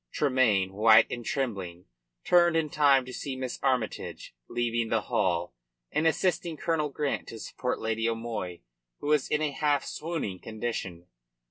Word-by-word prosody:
Tremayne, 120 -9 +2
white 110 +2 +7
and 120 - -4
trembling, 100 -10 -3 0.4
turned 175 -2 +4
in 155 -2 0
time 140 -3 +4
to 130 - -8
see 135 0 -4
Miss 130 -1 -4
Armytage 130 -5 -2 0.2
leaving 120 -1 -1
the 115 -1 +2
hall 85 -7 0 0.4
and 160 +2 +2
assisting 170 -1 0
Colonel 155 -1 0
Grant 145 +1 -2
to 115 - -8
support 125 +3 -3
Lady 115 +1 0
O'Moy, 115 -6 -4 0.4
who 145 - -4
was 150 -3 +3
in 150 0 0
a 150 - 0
half 145 0 +1
swooning 155 - -4
condition. 105 -6 -5
125 Hz, 150 wpm, -28 LUFS, 110-150 Hz, 0.4 s, white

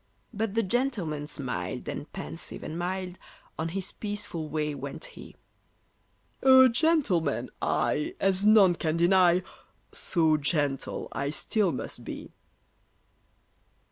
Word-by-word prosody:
But 215 -1 -2
the 225 - +2
gentleman 190 - -1
smiled, 135 -5 -4
and - - -6
pensive - - -6
and 155 - -5
mild, 180 +1 -4 0.4
On 160 +1 -1
his 190 +2 -3
peaceful 205 -7 -5
way 150 0 -1
went 140 0 -7
he: - - -12 1.1
"A 260 -1 +8
gentleman 235 - +1
I, 150 - 0
as 195 0 +2
none 210 -4 +6
can 165 -1 -1
deny, 180 0 +4 0.5
So 160 -3 +2
gentle 145 -2 -1
I 140 0 -2
still 195 +5 +1
must 130 - -5
be!" - - -8
180 Hz, 115 wpm, -28 LUFS, 155-205 Hz, 1.1 s, A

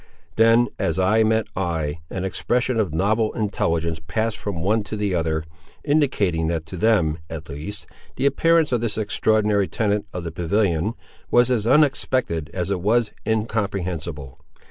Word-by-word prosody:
Then, 115 +2 +5
as 85 0 0
eye 95 +4 +3
met 110 -1 +2
eye, 80 -4 -2
an 95 0 -3
expression 120 +5 0
of 100 -7 0
novel 105 +7 +1
intelligence 85 -7 -1
passed 110 0 -1
from 100 -5 -4
one 110 +4 +2
to 105 - -5
the 105 -2 -1
other, 80 -2 0 0.4
indicating 105 - +1
that 80 -1 -2
to 80 - -8
them, 90 -6 +2
at 80 -1 -7
least, 75 +9 -7 0.3
the - - -1
appearance 165 +2 +3
of 120 -2 +1
this 115 -3 -2
extraordinary 105 -1 +1
tenant 105 -2 -1
of 90 - -5
the 85 - -4
pavilion 90 +3 0 0.4
was 120 +1 +4
as 115 -3 +1
unexpected 130 - +2
as 90 +2 -3
it 95 -3 -1
was 110 +3 +2 0.2
incomprehensible. 90 - -2
100 Hz, 155 wpm, -22 LUFS, 85-110 Hz, 0.4 s, Then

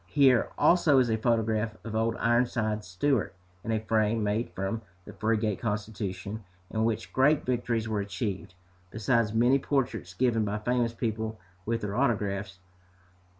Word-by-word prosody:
Here, 130 -1 +4
also, 165 -5 +5
is 125 -3 +3
a 110 - +2
photograph 110 -1 0
of 110 -1 -5
"Old 115 +1 +1
Ironsides" 115 -3 0
Stewart, 105 +4 0 0.3
in 115 - -3
a 110 - +1
frame 110 0 +1
made 105 +3 0
from 95 +4 -3 0.2
the - - -10
frigate 110 -2 0
Constitution, 105 -1 -4 0.3
in 110 0 0
which 115 -1 -2
great 145 +3 +3
victories 120 -3 -1
were 110 -2 -1
achieved, 100 -2 -4 0.3
besides 110 +1 +1
many 120 +5 +4
portraits 115 -10 -2
given 115 -1 +2
by 105 0 -1
famous 120 +2 0
people, 110 -1 -3 0.3
with 115 0 0
their 105 -1 -3
autographs. 100 -6 0
110 Hz, 150 wpm, -28 LUFS, 105-120 Hz, 0.3 s, also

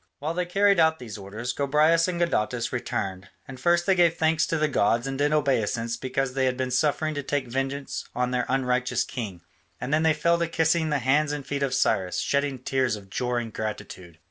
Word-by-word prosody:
While 155 +3 -3
they 180 +1 -2
carried 200 +1 +3
out 160 0 +4
these 115 -7 -8
orders, 110 +5 -5
Gobryas 150 +5 +3
and 175 -2 -2
Gadatas 125 -8 0
returned, 95 -6 -3 0.2
and 130 -1 -9
first 175 +4 +2
they 195 - +4
gave 170 -2 +3
thanks 160 -1 +2
to 165 - 0
the 155 0 +2
gods 115 -3 +1
and 135 0 -3
did 145 +2 +1
obeisance 120 -6 0
because 130 +2 -2
they 135 0 +1
had 130 -1 0
been 130 -1 -2
suffered 150 +4 +1
to 145 - -3
take 145 -1 -2
vengeance 135 +3 -3
on 125 0 0
their 125 -1 -1
unrighteous 125 -2 +1
king, 100 -9 -6 0.4
and 125 +4 -3
then 155 - +3
they 160 -1 +3
fell 170 +3 +2
to 170 - 0
kissing 160 0 +1
the 150 - +1
hands 145 +3 +2
and 145 -2 -4
feet 140 -1 -3
of 135 -2 0
Cyrus, 95 -8 +1
shedding 140 -1 0
tears 130 -2 0
of 100 -2 -12
joy 125 +1 -1
and 115 -2 -8
gratitude. 95 -6 -6
135 Hz, 215 wpm, -26 LUFS, 125-155 Hz, 0.4 s, out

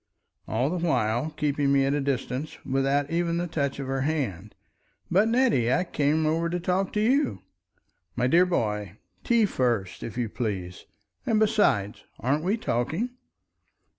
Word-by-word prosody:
All 125 +7 0
the 175 -1 -2
while, 120 -3 +1
keeping 145 -2 +1
me 135 -1 +4
at 135 - +1
a 145 - 0
distance, 135 +1 -3
without 135 +2 0
even 170 0 0
the 175 - -1
touch 140 -4 -2
of 140 - -4
her 135 0 -2
hand. 120 - -2 0.6
"But, 195 +5 +4
Nettie! 230 - +2
I 180 +7 +2
came 155 -2 +1
over 165 +2 +1
to 175 +1 -2
talk 185 +2 0
to 210 - 0
you!" 220 - +1 0.7
"My 125 - +1
dear 170 +8 +4
boy! 105 - -2 0.3
Tea 235 -2 +3
first, 120 - -1
if 115 - -6
you 120 -2 0
please! 95 -6 -4 0.4
And 220 -2 +3
besides—aren't 145 - +1
we 195 +6 +1
talking?" 165 - -1
145 Hz, 155 wpm, -26 LUFS, 120-175 Hz, 0.7 s, me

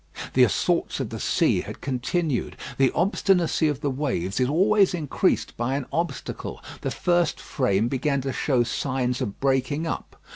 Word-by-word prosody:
The - - +6
assaults - - +1
of - - -3
the - - -5
sea - - +2
had - - -8
continued. 140 +2 -1 0.2
The 135 -1 +4
obstinacy 180 -2 +2
of 145 -2 -2
the 145 -2 0
waves 130 - -2
is 125 0 +2
always 195 +4 +4
increased 155 -5 0
by 120 +3 -1
an 140 -2 -2
obstacle. 170 +1 -3 0.2
The - - -1
first 175 -3 +1
frame 110 -4 0
began 140 +2 0
to 135 0 -3
show 130 -5 +2
signs 125 +1 -1
of 105 -6 -4
breaking 135 +3 +1
up. 165 - -4
140 Hz, 160 wpm, -25 LUFS, 125-165 Hz, 0.2 s, The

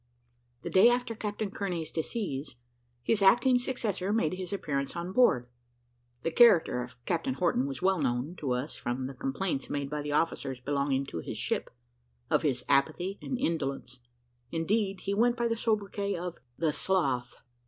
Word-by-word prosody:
The - - -4
day 190 +5 +7
after 245 -1 0
Captain 210 -1 -3
Kearney's 180 -6 -3
decease, 160 - -3 0.5
his 215 - +2
acting 240 +6 +5
successor 220 -7 -2
made 210 -8 +1
his 185 0 -5
appearance 140 -8 -2
on 170 +1 -4
board. 190 - +4 0.8
The 165 - 0
character 175 - +5
of 125 0 -8
Captain 255 +10 -1
Horton 165 -7 +1
was 140 +5 -6
well 190 -3 +3
known 130 +5 -1
to 135 -4 -1
us 125 +5 -3
from 125 +2 -3
the 135 - -5
complaints 135 +3 -2
made 140 -1 -3
by 150 0 -2
the 145 0 -4
officers 135 -4 0
belonging 140 0 0
to 85 - -5
his - - -6
ship, - - -2 0.6
of - - +4
his 130 -4 -1
apathy 160 +8 +1
and 255 - -3
indolence; 135 - -2 0.5
indeed, 195 +4 0
he 200 - -2
went 240 +3 +3
by 235 0 +1
the 230 - 0
sobriquet 205 -3 -1
of 175 0 -5 0.2
"the 160 -2 +1
Sloth." 135 -12 0
170 Hz, 165 wpm, -30 LUFS, 140-205 Hz, 0.8 s, day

